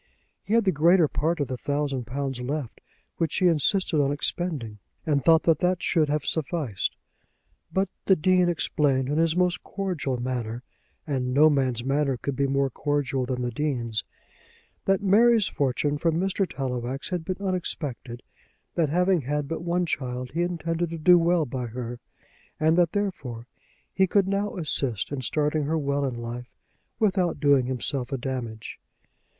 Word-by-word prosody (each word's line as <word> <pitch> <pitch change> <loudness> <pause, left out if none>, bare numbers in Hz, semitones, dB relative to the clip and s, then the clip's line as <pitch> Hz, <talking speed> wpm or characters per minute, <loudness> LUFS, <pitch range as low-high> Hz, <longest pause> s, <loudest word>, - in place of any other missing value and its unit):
He 215 - -1
had 230 - +4
the 190 - +4
greater 170 +2 +4
part 160 +4 -1
of 145 - 0
the 130 - -4
thousand 140 -2 -2
pounds 135 0 -3
left, 140 0 -4 0.4
which 165 -2 -1
he 185 - +2
insisted 165 0 +2
on 140 0 +1
expending, 145 - -2 0.3
and 145 -4 +1
thought 165 -1 +5
that 160 -2 +3
that 180 0 +1
should 155 -4 +2
have 150 0 0
sufficed. 150 - -2 0.8
But 190 +1 +1 0.2
the 190 - +5
Dean 180 +1 +3
explained 140 -5 +1
in 150 +2 +1
his 165 0 +2
most 180 -1 +1
cordial 180 -10 -3
manner, 120 -1 -3 0.4
and 130 -4 -1
no 155 +2 +6
man's 130 -4 0
manner 135 0 +1
could 140 +3 -3
be 140 +1 +1
more 135 0 +1
cordial 135 -2 -1
than 125 -1 -2
the 120 - -1
Dean's, 120 -5 -2 0.8
that 195 +1 +2
Mary's 220 +2 +5
fortune 145 +2 0
from 165 0 +1
Mr. 195 0 0
Tallowax 130 0 -4
had 180 -3 -2
been 185 +3 -3
unexpected, 150 -10 -3 0.5
that 160 -4 +1
having 180 +2 +2
had 145 +2 -2
but 165 +2 -4
one 175 +1 0
child 125 -5 -3
he 165 - -1
intended 170 -1 -1
to 165 - -5
do 175 +3 +6
well 170 -1 +2
by 125 -2 -4
her, 120 +1 -6 0.6
and 160 +1 +3
that, 175 -1 +3
therefore, 140 - -3 0.5
he 190 0 +3
could 195 +1 +2
now 200 +1 -1
assist 135 - -1
in 140 -2 -3
starting 150 +2 0
her 160 +3 0
well 140 -1 0
in 130 -3 -2
life 120 +1 -6 0.5
without 190 -5 +1
doing 140 -4 +4
himself 130 0 -2
a 135 - -1
damage. 120 -4 -5
145 Hz, 165 wpm, -26 LUFS, 130-175 Hz, 0.8 s, no